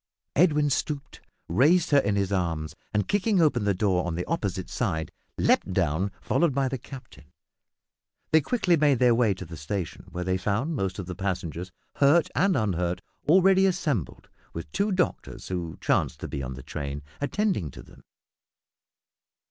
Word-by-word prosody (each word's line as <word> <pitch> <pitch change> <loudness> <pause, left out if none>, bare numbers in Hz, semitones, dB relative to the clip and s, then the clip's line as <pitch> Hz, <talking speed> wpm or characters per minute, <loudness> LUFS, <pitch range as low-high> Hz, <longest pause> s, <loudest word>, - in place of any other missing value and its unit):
Edwin 150 -2 +4
stooped, 140 0 -3 0.3
raised 150 - +3
her 145 - +7
in 105 -5 0
his 100 -1 0
arms, 85 -5 -1 0.2
and, 105 -1 0
kicking 205 0 +2
open 140 -10 +3
the 100 - +3
door 90 -2 +1
on 85 -2 -3
the 90 - -3
opposite 100 - -2
side, 80 -10 -2 0.3
leaped - - +2
down, 80 +7 +1
followed 165 -6 +1
by 135 -1 +2
the 130 0 -3
captain. 125 - -12 1.1
They 160 - +6
quickly 185 - +2
made 145 -4 +3
their 125 0 +5
way 115 -4 +2
to 90 - -8
the 80 +1 -9
station, 90 +3 -5
where 90 +1 -4
they 95 0 0
found 115 - -1
most 95 -6 -2
of 95 - -5
the 90 - -5
passengers, 90 -2 -4 0.3
hurt 145 +4 +4
and 195 -1 +2
unhurt, 90 -5 -1 0.3
already 190 +2 +6
assembled, 150 - -2 0.3
with 85 - -7
two 200 +2 0
doctors, 185 -2 -2
who 85 -3 -4
chanced - - 0
to - - -4
be 70 -1 -4
in 65 0 -5
the 65 - -10
train, 70 0 -5 0.2
attending 175 - 0
to - - -11
them. - - -18
105 Hz, 170 wpm, -26 LUFS, -, 1.1 s, her